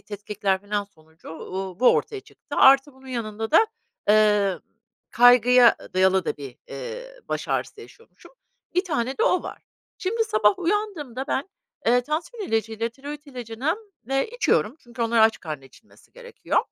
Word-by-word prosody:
tetkikler 205 Hz, -2 st, -3 dB
filan 205 Hz, 0 st, -2 dB
sonucu, 160 Hz, -4 st, -19 dB
uuu, 185 Hz, +4 st, -6 dB
bu 255 Hz, -, +6 dB
ortaya 420 Hz, -3 st, -2 dB
çıktı. -, -, -11 dB
Artı 270 Hz, +1 st, +6 dB
bunun 265 Hz, 0 st, -18 dB
yanında 225 Hz, -3 st, -4 dB
da, 440 Hz, +8 st, +6 dB, 0.4 s
eee, 210 Hz, -3 st, +4 dB, 0.5 s
kaygıya 245 Hz, 0 st, +6 dB, 0.2 s
dayalı 190 Hz, 0 st, +3 dB
da -, -, -2 dB
bir, 135 Hz, -3 st, -9 dB
eee, -, -, -7 dB, 0.2 s
baş -, -, -3 dB
ağrısı 430 Hz, -, -2 dB
yaşıyormuşum 460 Hz, +3 st, -17 dB, 0.4 s
bir 360 Hz, +2 st, +2 dB
tane 265 Hz, -, -2 dB
de -, -, +2 dB
o 370 Hz, -6 st, +2 dB
var. -, -, -8 dB, 0.4 s
Şimdi 450 Hz, +4 st, 0 dB
sabah 215 Hz, -, +2 dB
uyandığımda 340 Hz, -, -2 dB
ben, 275 Hz, +9 st, -1 dB, 0.4 s
eee, 245 Hz, +2 st, +5 dB
tansiyon 320 Hz, -, -4 dB
ilacıyla, 225 Hz, 0 st, -1 dB
tiroit 290 Hz, +5 st, -9 dB
ilacını, 255 Hz, -, -3 dB, 0.3 s
eee, 270 Hz, +9 st, 0 dB
içiyorum 310 Hz, -, +1 dB
çünkü 240 Hz, 0 st, -6 dB
onlar 230 Hz, 0 st, +1 dB
aç 220 Hz, 0 st, +4 dB
karnına 150 Hz, -5 st, -6 dB
içilmesi 135 Hz, -, -21 dB
gerekiyor, -, -, -3 dB
240 Hz, 150 wpm, -24 LUFS, 210-310 Hz, 0.5 s, bu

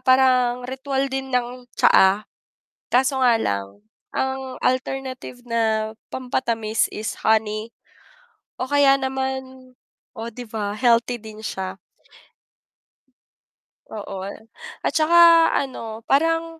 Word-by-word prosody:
parang 255 Hz, -1 st, +3 dB
ritwal 270 Hz, +1 st, -2 dB
din 265 Hz, 0 st, -3 dB
ng 250 Hz, 0 st, -2 dB
tsaa. 195 Hz, +2 st, +5 dB, 0.7 s
Kaso 265 Hz, +2 st, +3 dB
nga 240 Hz, -2 st, +5 dB
lang 100 Hz, -, -3 dB, 0.4 s
ang 265 Hz, -1 st, -2 dB
alternative 255 Hz, -1 st, -2 dB
na 220 Hz, -2 st, 0 dB, 0.2 s
pampatamis 230 Hz, -4 st, -1 dB
is 215 Hz, +1 st, -4 dB
honey 220 Hz, 0 st, +1 dB, 0.9 s
o -, -, -2 dB
kaya 280 Hz, 0 st, +4 dB
naman 265 Hz, -1 st, -4 dB, 0.4 s
oh, 225 Hz, +1 st, -5 dB
'di 245 Hz, 0 st, -9 dB
ba 210 Hz, -2 st, -3 dB
healthy 235 Hz, +1 st, +2 dB
din 220 Hz, 0 st, -10 dB
siya. 190 Hz, -2 st, -4 dB, 2.1 s
Oo. 195 Hz, -3 st, -6 dB, 0.6 s
At -, -, +1 dB
saka 335 Hz, +1 st, +6 dB
ano 230 Hz, -4 st, -4 dB
parang, 330 Hz, +4 st, +1 dB
250 Hz, 100 wpm, -22 LUFS, 220-265 Hz, 2.1 s, saka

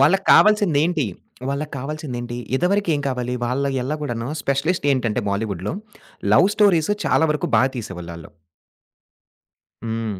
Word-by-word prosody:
వాళ్ళకి 155 Hz, +8 st, +4 dB
కావాల్సిదేం‌టి? 175 Hz, -, +4 dB, 0.4 s
వాళ్ళకి 145 Hz, +2 st, -3 dB
కావాల్సిదేం‌టి? 125 Hz, -4 st, -5 dB, 0.2 s
ఇదివరకేం 180 Hz, -2 st, +1 dB
కావాలి? 125 Hz, -1 st, -2 dB
వాళ్ళ 135 Hz, +3 st, -1 dB, 0.2 s
ఎల్లా 145 Hz, +5 st, -2 dB
గూడను 120 Hz, -3 st, -3 dB
స్పెషలిస్ట్ 145 Hz, +5 st, 0 dB
ఏంటంటే, 120 Hz, -3 st, 0 dB
బాలీవుడ్‌లో, 100 Hz, -, -3 dB, 0.6 s
లవ్ 185 Hz, -, +6 dB
స్టోరీస్ 195 Hz, -5 st, +3 dB
చాలా 160 Hz, -, +3 dB
వరకు 150 Hz, -, -2 dB
బా -, -, +5 dB
తీసేవోళ్ళాళ్ళు. 85 Hz, -7 st, -7 dB, 1.6 s
హ్మ్. 110 Hz, -3 st, -3 dB
140 Hz, 110 wpm, -21 LUFS, 115-160 Hz, 1.6 s, లవ్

